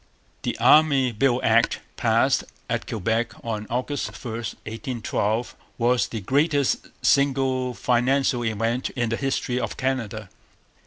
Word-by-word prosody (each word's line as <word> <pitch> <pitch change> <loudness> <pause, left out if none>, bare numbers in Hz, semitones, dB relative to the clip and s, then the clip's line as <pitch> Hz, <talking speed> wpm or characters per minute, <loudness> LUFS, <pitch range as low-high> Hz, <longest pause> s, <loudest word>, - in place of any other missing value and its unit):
The - - -3
Army 140 -5 +5
Bill 120 +2 +2
Act, - - +3 0.2
passed - - +2 0.2
at - - -2
Quebec 110 +3 -1
on 110 -2 -3
August 130 +4 -2
1, 120 -4 -7
1812, 115 0 -3 0.2
was 120 +1 +2
the 110 - -5
greatest 145 - +1 0.2
single 130 -2 +2
financial 125 0 +1
event 115 +2 -1
in 120 -3 0
the 115 - 0
history 130 -1 -1
of - - -4
Canada. 115 -6 -2
125 Hz, 120 wpm, -24 LUFS, 115-135 Hz, 0.2 s, Army